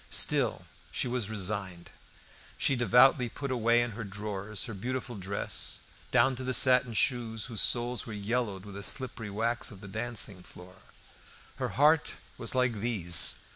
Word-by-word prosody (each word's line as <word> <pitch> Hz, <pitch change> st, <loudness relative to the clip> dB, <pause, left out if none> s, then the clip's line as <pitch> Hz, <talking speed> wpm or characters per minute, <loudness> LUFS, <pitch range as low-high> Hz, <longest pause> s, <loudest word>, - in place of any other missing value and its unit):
Still -, -, +3 dB, 0.3 s
she -, -, -1 dB
was 120 Hz, -4 st, -2 dB
resigned. 95 Hz, -4 st, -4 dB, 0.7 s
She 135 Hz, -, +3 dB
devoutly 125 Hz, +2 st, +5 dB
put 140 Hz, +3 st, -5 dB
away 120 Hz, -1 st, +3 dB
in 120 Hz, -, -4 dB
her 115 Hz, +2 st, -6 dB
drawers 100 Hz, 0 st, -4 dB
her 115 Hz, -, -5 dB
beautiful 125 Hz, +4 st, -4 dB
dress, 100 Hz, 0 st, -4 dB, 0.3 s
down 130 Hz, -1 st, +3 dB
to 130 Hz, -, -5 dB
the 130 Hz, 0 st, -1 dB
satin 125 Hz, -1 st, +4 dB
shoes 115 Hz, -4 st, 0 dB
whose 115 Hz, -4 st, -2 dB
soles 120 Hz, 0 st, +1 dB
were 115 Hz, -, -6 dB
yellowed 105 Hz, -2 st, -2 dB
with 100 Hz, -, -10 dB
the 100 Hz, -, -7 dB
slippery 120 Hz, -1 st, -2 dB
wax 115 Hz, +4 st, 0 dB
of 100 Hz, -, -10 dB
the 100 Hz, -, -10 dB
dancing 110 Hz, -2 st, -2 dB
floor. 90 Hz, +1 st, -14 dB, 0.8 s
Her -, -, -2 dB
heart 150 Hz, +2 st, +4 dB, 0.2 s
was 115 Hz, -, -1 dB
like 125 Hz, -4 st, +1 dB
these. 100 Hz, -7 st, +2 dB
115 Hz, 160 wpm, -30 LUFS, 100-125 Hz, 0.8 s, devoutly